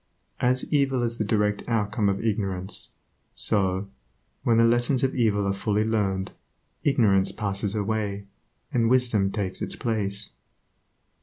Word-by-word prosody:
As 130 +1 +1
evil 135 -3 +2
is 115 0 -2
the - - +2
direct 105 -1 +1
outcome 105 -2 0
of 100 +3 -2
ignorance, 95 -3 -2 0.4
so, 95 -1 +2 0.5
when 115 -1 +2
the 115 - +5
lessons 120 +3 +2
of 135 - +1
evil 105 -4 +1
are 100 - +1
fully 105 +2 0
learned, 100 -4 -1 0.5
ignorance 105 -9 +3
passes 100 -1 -1
away, 105 -1 -2 0.5
and 115 -2 +2
wisdom 120 -6 +2
takes 100 -3 -3
its - - -2
place. 105 -3 -3
105 Hz, 135 wpm, -25 LUFS, 100-115 Hz, 0.5 s, the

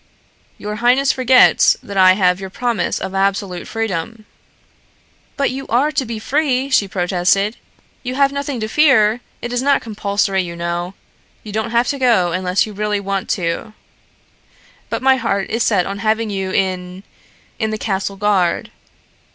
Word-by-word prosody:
"Your 210 +1 -5
highness 250 +4 +3
forgets 255 0 +5
that 200 - -8
I 185 -1 +6
have 185 -2 +2
your 190 -1 -6
promise 230 -3 -1
of 190 - -5
absolute 195 -2 -1
freedom." 225 0 -4 1.1
"But 280 -1 +1
you 270 +1 -6
are 270 +6 +2
to 270 -3 -1
be 230 -1 -5
free," 270 +3 0
she 205 -6 +3
protested. 190 +3 0 0.4
"You 255 0 -4
have 275 0 +3
nothing 280 -2 -4
to 215 - -2
fear. 245 -4 +3 0.2
It 240 0 -4
is 245 - 0
not 280 +1 +2
compulsory, 200 -3 -1
you 170 -1 -6
know. 170 +2 -4 0.5
You 215 - -8
don't 220 +2 -2
have 235 +1 +1
to 280 - -2
go 225 -9 +3
unless 185 +1 +1
you 215 - -9
really 210 0 -1
want 195 -1 -3
to. 170 +6 -3 1.2
But - - -3
my 265 0 +5
heart 200 -5 -2
is 230 +2 -1
set 195 -6 +2
on 200 +1 -5
having 220 +1 0
you 190 -1 -3
in 185 0 -2 0.6
in 220 -2 0
the 215 - -3
castle 200 -2 -2
guard." 195 -3 0
210 Hz, 165 wpm, -18 LUFS, 190-245 Hz, 1.2 s, I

